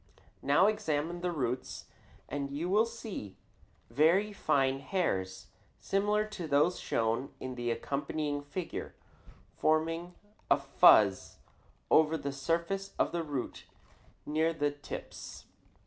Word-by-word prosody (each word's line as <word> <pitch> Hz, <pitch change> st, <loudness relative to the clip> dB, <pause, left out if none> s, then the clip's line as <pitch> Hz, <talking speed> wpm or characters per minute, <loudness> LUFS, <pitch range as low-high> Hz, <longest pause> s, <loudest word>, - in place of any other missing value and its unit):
Now 145 Hz, +7 st, +4 dB
examine 175 Hz, -5 st, 0 dB
the 180 Hz, -, 0 dB
roots 125 Hz, -5 st, -3 dB, 0.4 s
and 140 Hz, 0 st, -3 dB
you 150 Hz, +6 st, -3 dB
will 215 Hz, +4 st, +4 dB
see 220 Hz, -, -7 dB, 0.5 s
very 185 Hz, +8 st, +3 dB
fine 135 Hz, -7 st, +1 dB
hairs, 95 Hz, -, -2 dB, 0.3 s
similar 210 Hz, +2 st, +1 dB
to 200 Hz, -6 st, -6 dB
those 150 Hz, +5 st, +3 dB
shown 115 Hz, +4 st, -1 dB
in 130 Hz, -, -5 dB
the 120 Hz, -1 st, -3 dB
accompanying 145 Hz, +4 st, -2 dB
figure, 165 Hz, +5 st, -6 dB, 0.6 s
forming 165 Hz, +3 st, 0 dB, 0.3 s
a -, -, +6 dB
fuzz -, -, +5 dB, 0.5 s
over 160 Hz, +1 st, +5 dB
the 140 Hz, -2 st, -4 dB
surface 170 Hz, +8 st, -2 dB
of -, -, +1 dB
the 170 Hz, -, -1 dB
roots 145 Hz, -5 st, -5 dB, 0.6 s
near 160 Hz, +2 st, +1 dB
the 145 Hz, -2 st, 0 dB
tips. 145 Hz, 0 st, -8 dB
155 Hz, 115 wpm, -31 LUFS, 140-180 Hz, 0.6 s, a